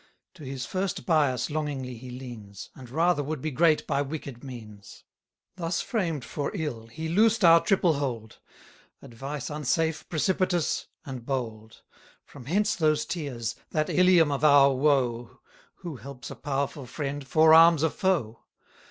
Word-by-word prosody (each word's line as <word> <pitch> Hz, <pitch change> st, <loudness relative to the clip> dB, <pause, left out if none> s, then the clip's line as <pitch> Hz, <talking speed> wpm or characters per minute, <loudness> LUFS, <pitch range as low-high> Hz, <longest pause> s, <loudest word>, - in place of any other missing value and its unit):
To 170 Hz, -, -13 dB
his 130 Hz, -1 st, -5 dB
first 190 Hz, 0 st, -3 dB
bias 145 Hz, -6 st, +1 dB
longingly 145 Hz, -5 st, -3 dB
he 125 Hz, +2 st, -10 dB
leans; 120 Hz, -6 st, -9 dB
And 125 Hz, -2 st, -12 dB
rather 165 Hz, +3 st, +2 dB
would 150 Hz, +1 st, -4 dB
be 155 Hz, +4 st, -3 dB
great 155 Hz, +2 st, +3 dB
by 140 Hz, -, 0 dB
wicked 140 Hz, -3 st, -6 dB
means. 110 Hz, -6 st, -11 dB, 0.5 s
Thus 165 Hz, -1 st, -2 dB
framed 165 Hz, -, -2 dB
for 140 Hz, +4 st, -3 dB
ill, 140 Hz, -, -4 dB
he 160 Hz, +8 st, -6 dB
loosed 215 Hz, +4 st, +3 dB
our 165 Hz, 0 st, +7 dB
triple 185 Hz, -4 st, +3 dB
hold; 125 Hz, -7 st, -4 dB, 0.6 s
Advice 135 Hz, +5 st, -6 dB
unsafe, 155 Hz, +2 st, -1 dB
precipitous, 180 Hz, +1 st, 0 dB, 0.2 s
and 130 Hz, -3 st, -7 dB
bold. 115 Hz, -4 st, -5 dB, 0.4 s
From 130 Hz, -4 st, -13 dB
hence 205 Hz, -, +1 dB
those 155 Hz, -3 st, +1 dB
tears! 135 Hz, -9 st, -4 dB
that 155 Hz, -1 st, -1 dB
Ilium 180 Hz, -4 st, +5 dB
of 140 Hz, +1 st, -2 dB
our 140 Hz, -2 st, +6 dB
woe! 130 Hz, -4 st, 0 dB, 0.4 s
Who 170 Hz, -7 st, -8 dB
helps 130 Hz, +2 st, -9 dB
a -, -, -7 dB
powerful 140 Hz, -1 st, -3 dB
friend, 140 Hz, +1 st, -5 dB
forearms 160 Hz, +2 st, +6 dB
a 160 Hz, -, +2 dB
foe. 155 Hz, -, -1 dB
145 Hz, 145 wpm, -27 LUFS, 125-165 Hz, 0.6 s, our